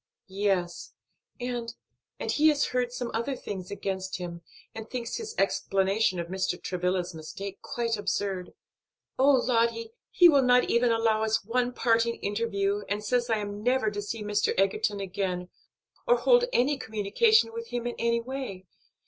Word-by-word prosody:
"Yes, 190 Hz, -3 st, -2 dB, 0.4 s
and 240 Hz, -2 st, -4 dB, 0.4 s
and -, -, -2 dB
he 305 Hz, +1 st, +4 dB
has 295 Hz, -2 st, +3 dB
heard 250 Hz, -1 st, 0 dB
some 245 Hz, -1 st, -4 dB
other 235 Hz, +5 st, -1 dB
things 190 Hz, -6 st, -6 dB
against 190 Hz, -2 st, -3 dB
him, 175 Hz, -2 st, -6 dB, 0.3 s
and 220 Hz, 0 st, -8 dB
thinks 245 Hz, -, -4 dB
his 445 Hz, -1 st, -6 dB
explanation 195 Hz, 0 st, +1 dB
of 170 Hz, -, -2 dB
Mr. 185 Hz, 0 st, -2 dB
Travilla's 180 Hz, 0 st, -2 dB
mistake 190 Hz, +5 st, -7 dB
quite 230 Hz, -2 st, -2 dB
absurd. 195 Hz, -2 st, -2 dB, 0.7 s
Oh, 270 Hz, +2 st, +5 dB
Lottie, 230 Hz, -3 st, +1 dB, 0.2 s
he 355 Hz, -, +7 dB
will 285 Hz, -5 st, +6 dB
not 250 Hz, -1 st, +4 dB
even 235 Hz, 0 st, +3 dB
allow 225 Hz, -1 st, +2 dB
us 220 Hz, -1 st, 0 dB
one 245 Hz, +2 st, 0 dB
parting 230 Hz, -1 st, +2 dB
interview 205 Hz, -1 st, -1 dB
and 205 Hz, +1 st, -2 dB
says 240 Hz, +2 st, 0 dB
I 225 Hz, -, +2 dB
am 205 Hz, 0 st, -5 dB
never 245 Hz, -2 st, +2 dB
to 205 Hz, 0 st, -4 dB
see 210 Hz, +1 st, -5 dB
Mr. 210 Hz, 0 st, 0 dB
Egerton 200 Hz, +1 st, +1 dB
again, 180 Hz, -2 st, -3 dB, 0.6 s
or 485 Hz, 0 st, +5 dB
hold -, -, +4 dB
any 275 Hz, -, +2 dB
communication 255 Hz, -, +2 dB
with 465 Hz, 0 st, -6 dB
him 240 Hz, -, -4 dB
in 240 Hz, -, -2 dB
any 235 Hz, 0 st, +1 dB
way. 245 Hz, -7 st, -6 dB
225 Hz, 160 wpm, -28 LUFS, 195-245 Hz, 0.7 s, he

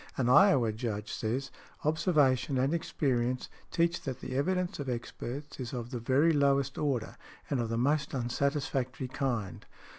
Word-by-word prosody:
An 125 Hz, -2 st, +1 dB
Iowa 130 Hz, -, +6 dB
Judge 110 Hz, -2 st, -4 dB
says, 125 Hz, +5 st, -2 dB, 0.3 s
observation 145 Hz, -4 st, +2 dB
and 135 Hz, +4 st, +2 dB
experience 130 Hz, -6 st, 0 dB, 0.2 s
"teach 170 Hz, 0 st, +1 dB
that 135 Hz, -3 st, -5 dB
the 130 Hz, -, -5 dB
evidence 180 Hz, +5 st, 0 dB
of 140 Hz, -2 st, -3 dB
experts 125 Hz, +4 st, -5 dB
is 125 Hz, -1 st, -5 dB
of 120 Hz, -1 st, -5 dB
the 125 Hz, -, -3 dB
very 135 Hz, +8 st, +3 dB
lowest 140 Hz, -2 st, +2 dB
order, 135 Hz, -7 st, -1 dB, 0.3 s
and 140 Hz, -, +1 dB
of 115 Hz, -1 st, -1 dB
the 115 Hz, -, -1 dB
most 140 Hz, +3 st, +1 dB
unsatisfactory 130 Hz, 0 st, -1 dB
kind." 125 Hz, -8 st, -2 dB
135 Hz, 150 wpm, -31 LUFS, 120-145 Hz, 0.3 s, Iowa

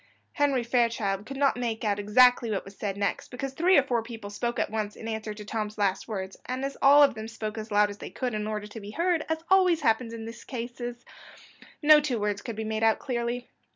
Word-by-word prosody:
Henry 280 Hz, -4 st, +2 dB
Fairchild 230 Hz, -4 st, 0 dB
could 275 Hz, -, -6 dB
not 275 Hz, 0 st, +3 dB
make 235 Hz, -2 st, -2 dB
out 205 Hz, -1 st, +1 dB
exactly 240 Hz, +3 st, +5 dB
what 200 Hz, -3 st, -2 dB
was 195 Hz, +1 st, -12 dB
said 200 Hz, -1 st, -4 dB
next, 200 Hz, -1 st, -2 dB
because 265 Hz, +2 st, -5 dB
three 350 Hz, +6 st, +4 dB
or 280 Hz, -, +6 dB
four 245 Hz, -4 st, 0 dB
people 225 Hz, -3 st, -8 dB
spoke 235 Hz, +4 st, -2 dB
at -, -, -1 dB
once 215 Hz, -1 st, -3 dB
in 225 Hz, -, -8 dB
answer 220 Hz, -1 st, -4 dB
to 210 Hz, 0 st, -9 dB
Tom's 215 Hz, 0 st, -4 dB
last 195 Hz, -2 st, 0 dB
words, 190 Hz, -3 st, -5 dB
and 255 Hz, +2 st, -2 dB
as 275 Hz, -, -4 dB
all 285 Hz, +2 st, +8 dB
of 285 Hz, -, +4 dB
them 220 Hz, 0 st, -7 dB
spoke 220 Hz, -1 st, -5 dB
as 220 Hz, 0 st, -6 dB
loud 205 Hz, 0 st, +4 dB
as 205 Hz, -, -11 dB
they -, -, -7 dB
could 250 Hz, -3 st, -3 dB
in 210 Hz, 0 st, -2 dB
order 210 Hz, -1 st, -3 dB
to 210 Hz, +2 st, -9 dB
be 205 Hz, -1 st, -9 dB
heard, 335 Hz, +6 st, 0 dB
as 320 Hz, 0 st, -2 dB
always 365 Hz, -4 st, +5 dB
happens 230 Hz, -2 st, +1 dB
in 230 Hz, -1 st, -7 dB
these 230 Hz, +1 st, -9 dB
cases, 240 Hz, 0 st, -6 dB, 0.8 s
no 305 Hz, 0 st, +8 dB
two 275 Hz, -6 st, -1 dB
words 205 Hz, -1 st, -1 dB
could 230 Hz, -3 st, -6 dB
be 220 Hz, -, -4 dB
made 220 Hz, 0 st, -2 dB
out 225 Hz, -1 st, +4 dB
clearly. 240 Hz, -1 st, -3 dB
230 Hz, 240 wpm, -27 LUFS, 210-255 Hz, 0.8 s, all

